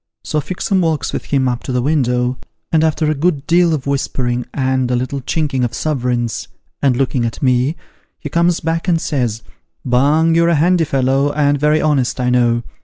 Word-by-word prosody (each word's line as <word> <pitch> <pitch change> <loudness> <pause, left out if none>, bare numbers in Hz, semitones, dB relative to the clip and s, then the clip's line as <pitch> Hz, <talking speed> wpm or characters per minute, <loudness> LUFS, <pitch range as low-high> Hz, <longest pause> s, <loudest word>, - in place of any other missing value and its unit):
So 150 - -1
Fixem 185 +3 -1
walks 155 -6 -1
with - - -4
him 135 -2 +1
up 125 -1 -2
to - - -5
the 125 -1 0
window, 125 -3 0 0.3
and 160 -1 +3
after 155 -1 +1
a - - +1
good 150 -1 -1
deal 170 0 +3
of 150 -4 -2
whispering, 125 -3 -2
and 130 -2 0
a 125 - +1
little 130 +3 -3
chinking 145 -2 -1
of 120 -1 -2
suverins, 125 -6 -2 0.3
and 130 -3 +2
looking 130 -2 0
at 115 +4 -4
me, 130 +4 +2 0.4
he 150 - -7
comes 170 +3 +1
back 165 +2 -2
and 170 -2 +2
says, 120 -8 -2 0.2
' - - -45
Bung, 145 +6 +3
you're 170 +1 +3
a 170 - +3
handy 170 +2 +3
fellow, 135 +1 +1
and 145 -1 +1
very 150 +2 +2
honest, 140 -5 +1
I 125 0 +1
know. 120 -1 +2
140 Hz, 195 wpm, -17 LUFS, 125-155 Hz, 0.4 s, and